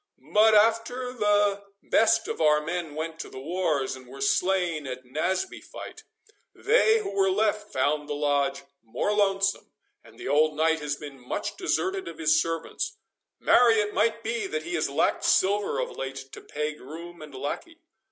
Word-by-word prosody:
But 215 +1 +6
after 230 +4 +2
the 205 -3 +2 0.2
best 225 - +3
of - - -4
our 150 -1 +5
men 160 -1 -4
went 160 +1 -5
to - - -6
the - - -11
wars, 155 -3 -1
and 130 -1 -13
were 135 +2 -11
slain 170 +1 +1
at 130 0 -6
Naseby 155 - -2
fight, - - -10 0.5
they 445 0 +4
who 430 - -3
were 195 -1 +2
left 210 +1 0
found 145 +3 0
the 145 - -2
Lodge 140 -1 0 0.2
more 115 - -2
lonesome, 195 -1 +1 0.3
and - - -18
the - - -7
old 150 +2 +3
knight 160 +1 +2
has 150 -1 -2
been 145 -2 -10
much 125 - -4
deserted 380 0 -1
of - - -8
his 320 -1 +3
servants:—marry, 240 - 0
it 210 -1 0
might 225 +2 +1
be, 225 -2 -2
that 155 -3 -3
he 175 +2 -6
has 155 -4 0
lacked 140 - +1
silver 200 +2 +2
of - - -2
late 135 0 -6
to - - -10
pay 150 +1 -3
groom 165 +4 -10
and 150 -3 -10
lackey." 235 - -5
175 Hz, 170 wpm, -26 LUFS, 145-215 Hz, 0.5 s, But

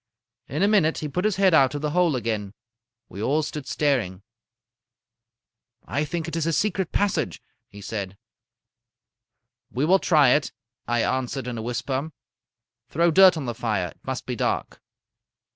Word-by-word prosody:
In 150 +7 -1
a - - +5
minute 195 -7 +3
he 155 - -3
put 180 +7 -2
his 215 -3 +2
head 190 -2 +3
out 135 -3 +4
of 145 - -3
the 150 - -1
hole 175 -3 +2
again. 110 -4 -3 0.5
We 100 - -8
all 145 +7 +1
stood 150 -1 -6
staring. 115 -11 0 1.6
"'I 140 +7 -1
think 170 +1 -4
it 165 - -5
is 165 -1 -1
a 165 - +1
secret 190 +1 0
passage,' 205 -1 0 0.3
he 100 0 -13
said. 100 -2 -5 1.5
"'We 130 +4 -1
will 190 +4 +4
try 150 -8 +4
it,' 145 +3 +2 0.4
I 120 -1 +1
answered 130 0 -2
in 120 -2 -4
a - - -4
whisper. 130 +5 -3 0.8
'Throw 170 +3 +2
dirt 185 +1 +7
on 145 - -4
the 120 - -3
fire. 105 -6 -2
It - - -18
must - - -4
be - - -3
dark.' - - -2
145 Hz, 165 wpm, -24 LUFS, 120-165 Hz, 1.6 s, dirt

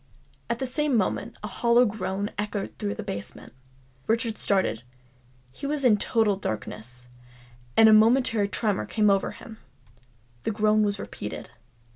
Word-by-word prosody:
At 235 - 0
the 265 - -3
same 280 0 0
moment 195 - -1
a - - -3
hollow 235 +3 +3
groan 200 -1 -3
echoed 205 0 -4
through 100 0 -2
the - - -6
basement. 100 +1 -7 0.5
Richard 225 0 0
started: 190 - +1 0.7
he 280 - -6
was 290 -2 -2
in 220 -4 +6
total 210 -1 +1
darkness—and 125 - -3
a 220 - +7
momentary 225 -1 +4
tremor 200 0 -1
came 210 -2 +3
over 195 -1 +1
him. 220 -1 -11 0.8
The - - -2
groan 215 0 +2
was 205 -1 0
repeated. 105 - -7
210 Hz, 140 wpm, -26 LUFS, -, 0.8 s, a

